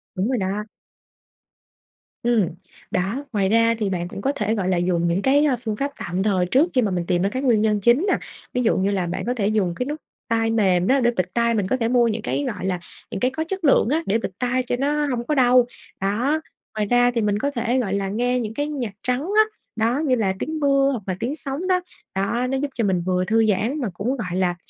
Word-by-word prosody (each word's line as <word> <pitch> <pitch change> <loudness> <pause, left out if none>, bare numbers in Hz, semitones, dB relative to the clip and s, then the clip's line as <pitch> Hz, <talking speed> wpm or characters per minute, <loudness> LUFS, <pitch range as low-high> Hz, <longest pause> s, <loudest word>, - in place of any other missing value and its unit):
Đúng 185 +3 0
rồi 255 - +1
đó. 195 +1 -2 1.6
Ừm, 230 -6 +3 0.4
đó, 195 +10 -1
ngoài 195 -3 +1
ra 230 +1 +4
thì 210 -3 0
bạn 175 -2 -2
cũng 195 - -7
có 270 - +1
thể, 215 -1 0
gọi 190 -4 -1
là, 185 - +2
dùng 175 -1 +1
những 170 +3 +1
cái, 280 +6 +4
a, 275 -4 +3
phương 225 -3 -4
pháp 280 +6 -2
tạm 185 -2 -2
thời 190 -4 +2
trước 270 - +3
khi 255 - +3
mà 210 -4 0
mình 175 -2 -1
tìm 175 0 +1
ra 195 - +2
cái 255 +5 -3
nguyên 240 -6 +3
nhân 215 -1 +2
chính 240 - +4
nè, - - +3 0.4
ví 250 - +1
dụ 225 - +2
như 195 +2 +1
là 190 -3 0
bạn 175 - -3
có 245 - 0
thể 210 -5 0
dùng 200 -5 +1
cái 250 - -2
nút 300 +3 -4 0.3
tai 225 0 +1
mềm 190 -5 +2
đó 270 +1 +4
để 240 -2 +3
bịt 185 -5 -2
tai. 235 0 +2
Mình 205 -4 0
có 255 - +1
thể 230 -2 0
mua 240 -1 +3
những 220 0 -2
cái, 285 - -2
gọi 185 - -6
là, 185 -2 -1 0.3
những - - -3
cái 255 +5 +1
có 315 +4 -2
chất 385 +1 -4
lượng 275 -6 +4
á 315 +4 +1
để 210 - +2
bịt 230 - -4
tai 255 +1 0
cho 245 - -1
nó 295 +2 +1
hông 245 -4 -2
có 300 - +1
đau, 250 -2 +5 0.4
đó. 240 +11 +1 0.3
Ngoài 215 -1 0
ra 245 +1 +4
thì 230 - +2
mình 205 -1 +1
có 285 +5 -1
thể, 245 0 0
gọi 200 -6 -1
là, 200 -1 -1
nghe 245 +4 0
những 220 -2 -4
cái 290 +4 -2
nhạc 260 -9 -4
trắng 250 +1 0
á, 405 +7 +3 0.3
đó, 230 +4 +1
như 260 -3 +3
là 205 -5 +1
tiếng 315 0 -3
mưa 275 -1 +3
hoặc 240 -6 -4
là 185 - -1
tiếng 255 +6 -2
sóng 300 +4 -4
đó, 365 -1 +2 0.3
đó, 235 +6 0
nó 270 - 0
giúp 290 +2 -1
cho 235 - 0
mình 190 -4 +1
vừa 185 +1 0
thư 225 +3 +3
giãn 220 +8 0
mà 235 - -1
cũng, 240 +9 -2
gọi 180 -7 -4
là, 180 -1 +1
230 Hz, 260 wpm, -22 LUFS, 195-260 Hz, 1.6 s, đau